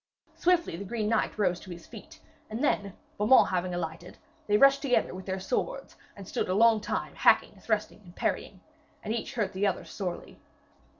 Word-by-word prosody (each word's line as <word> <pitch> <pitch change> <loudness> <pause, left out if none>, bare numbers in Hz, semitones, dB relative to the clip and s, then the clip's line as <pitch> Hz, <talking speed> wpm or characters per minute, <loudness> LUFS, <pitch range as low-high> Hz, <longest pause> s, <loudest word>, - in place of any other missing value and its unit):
Swiftly 345 - +2
the 190 - -6
green 215 +1 -2
knight 225 -1 0
rose 180 -4 +1
to - - -13
his 170 -1 -9
feet, 310 +8 -12 0.3
and 220 +5 -4
then, 200 -9 0 0.2
Beaumains 215 +6 +6
having 180 0 -1
alighted, 170 +1 -6 0.3
they 210 0 +4
rushed 275 +3 +6
together 255 -9 +1
with 185 +1 -9
their 190 0 -2
swords, - - -3 0.2
and 195 -2 -10
stood - - -2
a 185 - +1
long 225 0 +5
time - - -3
hacking, - - +3
thrusting 215 -2 -2
and 175 -2 -16
parrying. - - -2 0.4
And 215 - -2
each 235 +3 -4
hurt 215 -4 -1
the 195 +2 +1
other 185 -2 -2
sorely. 180 +1 -6
205 Hz, 185 wpm, -28 LUFS, 185-235 Hz, 0.4 s, Beaumains